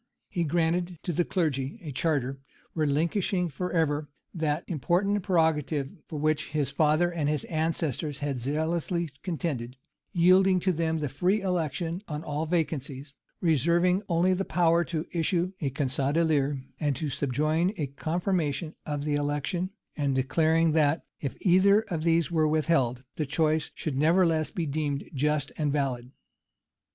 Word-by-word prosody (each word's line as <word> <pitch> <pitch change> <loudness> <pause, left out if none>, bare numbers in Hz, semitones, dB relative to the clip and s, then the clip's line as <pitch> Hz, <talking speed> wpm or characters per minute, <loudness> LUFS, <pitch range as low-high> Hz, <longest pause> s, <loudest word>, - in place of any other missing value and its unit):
He 175 - -1
granted 170 +2 0
to 175 - -2
the 175 - +2
clergy 150 - -1
a 150 - -5
charter, 135 -2 -1 0.3
relinquishing 170 +4 +1
forever 155 -2 -1 0.2
that 155 -1 -1
important 185 +6 +1
prerogative 160 -6 +1 0.2
for 155 - -6
which 155 +1 0
his 150 -3 0
father 155 +3 +3
and 150 -4 0
all - - +2
his 150 - -2
ancestors 155 -3 -1
had 140 -3 -2
zealously 160 +5 -1
contended; 145 -9 -3 0.3
yielding 185 +1 +5
to 185 - +2
them 160 -1 0
the 150 -2 -2
free 180 +10 +1
election 170 -1 -1
on 150 0 -4
all 150 +2 -2
vacancies; 145 -4 -2 0.3
reserving 170 +4 +3
only 175 +2 +3
the 190 +1 0
power 170 -2 +3
to 160 -1 -3
issue 175 +2 0
a 140 - 0
conge 135 -1 -2
d'élire 145 -1 +1 0.2
and 145 -3 0
to 150 0 -3
subjoin 155 +7 +1
a 150 - -1
confirmation 160 +2 -1
of 145 -1 -2
the 150 0 -1
election; 145 +5 -1 0.3
and 140 -3 0
declaring 160 +5 +2
that, 155 0 +2
if 140 - -4
either 200 +3 +5
of 165 -4 -2
these 165 -1 +2
were 160 -2 +3
withheld, 145 -6 +1
the 155 - 0
choice 155 +1 +1
should 150 -4 -3
nevertheless 165 0 +3
be 170 - -3
deemed 145 -1 -2
just 150 0 0
and 150 -2 +1
valid. 130 -4 -1
155 Hz, 150 wpm, -28 LUFS, 145-170 Hz, 0.3 s, yielding